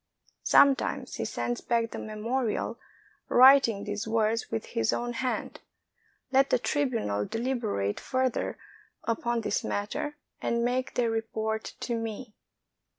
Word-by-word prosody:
Sometimes 275 -1 +3
he - - -2
sends 240 0 -2
back 230 -1 0
the - - -5
memorial, 220 +2 -2 0.5
writing 255 -5 +7
these 205 +1 -4
words 225 0 +1
with 110 - -3
his 110 -1 0
own 240 0 -2
hand, 255 +1 -3 0.7
"Let 270 +1 +4
the - - +4
tribunal 235 - 0
deliberate 225 - -1
further 260 -1 -1 0.5
upon 235 +1 -1
this 210 -1 -1
matter 295 +9 -3 0.2
and 235 0 0
make 255 +1 -1
their 235 -2 +2
report 220 -1 -3
to 240 - -2
me." 225 0 -4
230 Hz, 125 wpm, -28 LUFS, 220-255 Hz, 0.7 s, writing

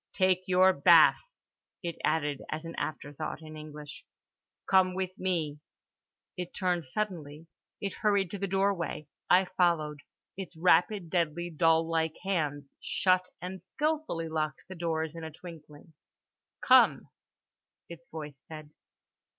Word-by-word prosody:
"Take 185 -1 +2
your 185 +1 +5
bath," - - +6 0.6
it 170 -1 -3
added 145 -3 0
as 155 +2 -4
an 165 - -6
afterthought, 145 +1 -5
in 155 0 -10
English—"Come 155 +4 -3
with 185 -1 -3
me." 165 -6 -1 0.8
It 180 -1 -6
turned 180 -4 0
suddenly. 160 -2 -4 0.3
It 200 -1 -3
hurried 200 -4 +2
to 205 - -5
the 195 - -1
doorway. 195 -5 0 0.2
I 185 +1 +6
followed. 170 -5 +1 0.4
Its 185 -3 -8
rapid 175 +1 +3
deadly 170 0 -1
doll 165 0 +3
like 160 -1 0
hands 150 -7 -1
shut 185 -1 +1
and 185 0 -6
skillfully 300 - -2
locked 155 -2 -3
the 190 - -8
doors 160 -2 -2
in 165 - -7
a 160 - -5
twinkling. 160 -1 -13 0.7
"Come," - - +5 0.8
its 170 0 -12
voice 150 -3 -8
said. 155 -2 -10
170 Hz, 125 wpm, -30 LUFS, 155-185 Hz, 0.8 s, bath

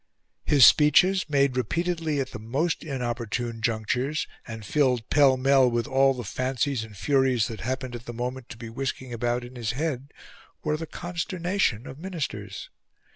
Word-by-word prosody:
His 140 -5 +7
speeches, 180 +4 +5
made 140 -3 +2
repeatedly 160 +4 -1
at 130 -1 -2
the - - -7
most 135 +10 -1
inopportune 120 -4 -3
junctures, 120 +6 0 0.2
and 115 -2 -7
filled 125 -2 +1
pell 140 -3 +5
mell 135 -1 +4
with 120 -1 0
all 135 -1 +3
the 125 - -5
fancies 130 +2 -1
and 110 -2 -11
furies 130 -3 +2
that 110 - -7
happened 130 +1 -3
at 120 0 -7
the - - -4
moment 125 +1 -5
to 110 - -9
be 115 - -8
whisking 130 +1 -4
about 120 +1 -1
in 120 +1 -10
his 115 -2 -2
head, 140 -1 -3 0.5
were 150 -1 0
the 160 +1 -5
consternation 175 - -2
of 135 - -9
Ministers. 140 - -5
130 Hz, 165 wpm, -26 LUFS, 120-145 Hz, 0.5 s, His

